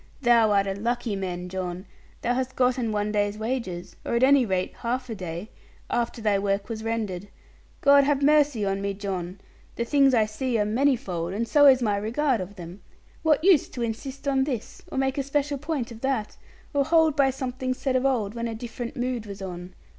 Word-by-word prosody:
Thou 235 -2 +5
art 200 -1 +3
a 195 - -1
lucky 235 +1 -2
man, 180 -2 -4
John; 180 0 -5 0.4
thou 245 - +1
hast 260 +1 -2
gotten 250 -2 +1
one 210 0 -1
day's 205 0 0
wages, 220 -6 -4
or - - -2
at 235 - +2
any 270 -2 +5
rate 185 -1 -1
half 250 +1 -3
a - - -1
day, 180 0 -6 0.4
after 235 -1 -1
thy 205 -2 +2
work 200 +1 -1
was 220 -1 -5
rendered. 210 -4 -3 0.5
God 280 0 +6
have 285 -1 +1
mercy 290 -7 +4
on 195 0 -1
me, 200 0 -2
John! 190 -2 -4 0.4
The 235 - -2
things 275 0 +4
I 220 -2 +4
see 235 +3 -2
are 210 - +2
manifold; 210 -8 0
and 230 +3 -2
so 290 +4 +6
is 260 -2 +6
my 205 -3 +1
regard 235 +3 0
of 185 +3 -7
them. 180 +1 -10 0.4
What 310 -1 +2
use 360 -5 +5
to 240 - -4
insist 265 +5 -5
on 270 -1 +3
this, 250 -7 -5
or - - -4
make 265 +1 0
a - - +2
special 280 +1 -1
point 295 -5 -3
of 230 -1 -10
that, 265 -6 -1 0.4
or 285 -1 +3
hold 320 0 +3
by 275 -2 +4
something 255 -1 -3
said 265 0 -1
of 255 - +2
old, 235 -7 +1
when 235 0 -3
a 225 - -4
different 235 +3 -6
mood 245 -3 -2
was 200 -1 -7
on? 180 -1 -7
235 Hz, 205 wpm, -26 LUFS, 200-265 Hz, 0.5 s, God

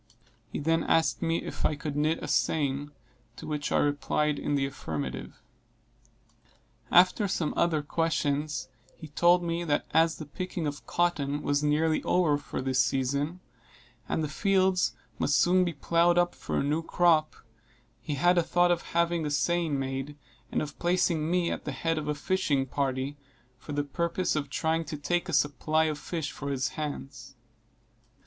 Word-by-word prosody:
He - - -3
then 165 +2 +1
asked 165 0 +2
me 165 0 0
if - - -6
I 150 - +2
could 150 -1 -5
knit 155 +2 0
a - - -4
seine, 145 -1 0 0.5
to - - -9
which 150 -1 -3
I - - +3
replied 145 +1 +1
in 145 - -1
the 135 -1 +1
affirmative. 75 - -5 1.5
After 185 +3 +5
some 165 -4 -1
other 160 -3 +1
questions, 150 -2 -1 0.3
he 155 - -11
told 175 +4 +4
me 170 0 -1
that 150 -4 0
as 160 +1 +3
the 155 - -7
picking 180 +2 -4
of 145 0 -5
cotton 150 -4 0
was 145 0 +1
nearly 155 +2 +2
over 160 -5 +2
for 140 - -5
this 130 0 +2
season, 140 +7 -1 0.7
and 160 - 0
the - - -1
fields 185 - +2 0.2
must 145 - +2
soon 180 +1 +4
be 175 -2 -1
ploughed 170 +4 +2
up 175 0 +3
for - - -4
a - - +1
new 150 +3 0
crop, 165 -2 +2 0.7
he 150 - -3
had 175 +5 +4
a - - +4
thought 175 +1 +2
of 170 -1 +1 0.2
having 170 -1 +2
a 150 - -1
seine 170 +3 +1
made, 135 +2 -4 0.3
and - - 0
of 150 -1 -8
placing 170 -3 +1
me 175 -1 +1
at - - -4
the - - -4
head 165 -1 -1
of 150 - -6
a 150 - 0
fishing 145 -4 0
party, 135 +1 -2 0.4
for 125 - -10
the 145 0 0
purpose 170 +5 -1
of 145 -2 -2
trying 160 +3 0
to 155 - -6
take 175 +5 -1
a - - -2
supply 150 +2 +2
of 155 -2 -1
fish 160 -3 -4
for 140 - -6
his 130 -2 -1
hands. 140 -2 -6
155 Hz, 175 wpm, -28 LUFS, 145-170 Hz, 1.5 s, After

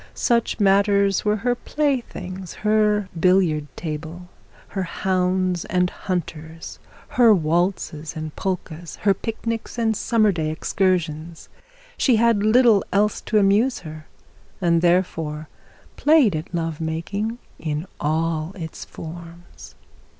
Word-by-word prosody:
Such 235 -1 +1
matters 200 0 +3
were 210 0 +2
her 245 +4 0
playthings, 235 - -3
her 210 -1 +3
billiard 170 -4 +3
table, 160 +2 -6 0.4
her 195 - -3
hounds 185 -1 0
and 180 -1 +1
hunters, 165 -3 -5 0.3
her 240 -3 +5
waltzes 165 -2 -1
and 155 -1 -6
polkas, 175 -3 -4
her 200 -1 +4
picnics 225 +3 -4
and 225 -2 +1
summer 215 -1 +2
day 160 -4 -2
excursions. 165 -1 -1 0.5
She 255 - +4
had 230 -2 +3
little 220 -1 +5
else 205 +2 +1
to 215 - 0
amuse 210 +6 +3
her, 155 -2 -10 0.5
and 170 -2 +2
therefore 165 -4 0 0.5
played 290 - +4
at 155 +4 -5
love 165 -2 -3
making 185 +8 -3 0.2
in 155 +1 -3
all 160 +2 -1
its 165 -4 -7
forms. 170 +1 -11
185 Hz, 115 wpm, -22 LUFS, 160-210 Hz, 0.5 s, her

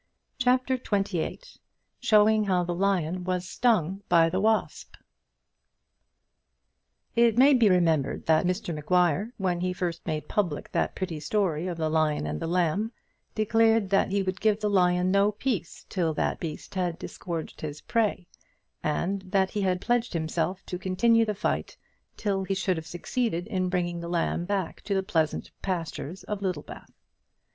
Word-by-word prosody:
CHAPTER 255 +1 +2
XXVIII 195 - -1 0.6
Showing 215 0 +4
How 185 -2 +2
the 175 0 -2
Lion 185 -2 0
Was 180 0 -2
Stung 195 -6 +1
by 165 -1 +5
the 185 - 0
Wasp 220 +1 0 2.2
It 235 -1 +4
may 275 +3 +7
be 235 -5 +5
remembered 165 -6 +2
that 160 +2 +3
Mr 180 -1 -2
Maguire, 180 +6 +1
when 180 -3 0
he 180 0 0
first 175 -2 -3
made 155 -2 -2
public 175 -8 -1
that - - 0
pretty 175 -5 -3
story 180 -2 0
of 175 -2 -3
the 160 -1 0
Lion 155 - +1
and 75 0 -3
the - - -3
Lamb, 180 +5 +1 0.4
declared 225 -1 +3
that 195 - +3
he 195 0 +1
would 185 0 -3
give 215 -1 +3
the 210 -1 0
lion 180 -1 +3
no 200 +2 +3
peace 210 -6 -3
till 165 -5 -1
that - - -1
beast 155 -3 -6
had 180 -3 -1
disgorged 170 -2 -6
his 150 -1 -5
prey, 215 -5 0 0.6
and 180 +6 -1
that 190 -1 +2
he 210 - -2
had 185 -2 +1
pledged 240 -2 0
himself 170 +3 -2
to 180 - -5
continue 230 +5 +3
the 210 -1 -2
fight - - -2 0.4
till 195 -2 -1
he 195 +1 -1
should 190 -2 0
have 160 - -6
succeeded 175 0 -2
in 185 -4 -1
bringing 175 -2 -1
the 170 0 -6
lamb 170 0 0
back 195 -3 -2
to 200 - -2
the 190 - +1
pleasant 160 -5 -1
pastures 175 -2 -4
of 210 -1 -4
Littlebath. 180 -6 -5
185 Hz, 160 wpm, -27 LUFS, 170-210 Hz, 2.2 s, may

